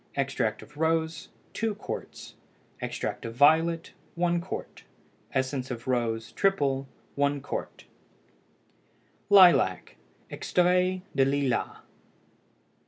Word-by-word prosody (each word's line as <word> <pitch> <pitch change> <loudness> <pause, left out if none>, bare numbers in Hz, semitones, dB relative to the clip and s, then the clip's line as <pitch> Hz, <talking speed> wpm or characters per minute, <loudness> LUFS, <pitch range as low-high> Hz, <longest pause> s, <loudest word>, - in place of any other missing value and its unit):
Extract 135 -5 -1
of 150 - -17
rose 160 0 0 0.2
2 225 -2 -1
qts. 210 - -7 0.5
Extract - - -4
of 115 0 -6
violet 160 +4 +3 0.2
1 175 0 +1
qt. 185 - -7 0.5
Essence 130 0 -2
of 120 0 -6
rose 115 -3 -1
(triple) 140 -9 +1 0.3
1 140 0 +1
qt. 140 - -6 1.5
LILAC 190 -3 +5 0.3
(EXTRAIT 180 +1 +1
DE 135 - +4
LILAS). 135 -2 -1
145 Hz, 95 wpm, -27 LUFS, 135-175 Hz, 1.5 s, LILAC